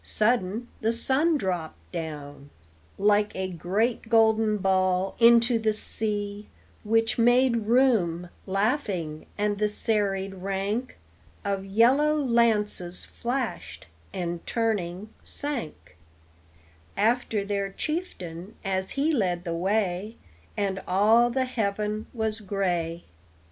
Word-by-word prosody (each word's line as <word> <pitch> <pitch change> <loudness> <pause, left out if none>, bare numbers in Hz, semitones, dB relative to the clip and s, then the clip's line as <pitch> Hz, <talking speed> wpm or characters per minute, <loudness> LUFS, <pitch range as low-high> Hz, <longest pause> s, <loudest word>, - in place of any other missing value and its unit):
Sudden 225 0 0
the 225 0 +2
sun 275 +7 +2
dropped 180 - -4
down 145 -4 -7 0.5
Like 205 +1 +2
a 190 0 -2
great 205 +8 -1
golden 220 -1 +4
ball 185 -1 +1
into 235 0 +6
the 220 -1 +1
sea, 210 -1 -2 0.3
Which 225 +2 +1
made 240 -1 +3
room, 215 -9 +2 0.2
laughing, 195 - -1
and 205 -1 0
the 210 0 +2
serried 200 -3 0
rank 195 +6 -3 0.5
Of 195 -1 -1
yellow 255 +10 +4
lances 225 -9 +1
flashed, 250 +2 -4 0.3
and, 175 -3 -4
turning, 210 -4 -1
sank 160 - -5 1.0
After 220 -1 +1
their 200 -1 -1
chieftain, 195 - -5
as 190 0 0
he 295 +4 +2
led 180 - 0
the 170 -2 -3
way, 195 +3 -1 0.4
And 195 -2 -1
all 220 +6 +4
the 260 +2 0
heaven 215 -3 -2
was 220 -2 -1
gray. 175 -5 -2
210 Hz, 105 wpm, -26 LUFS, 185-230 Hz, 1.0 s, into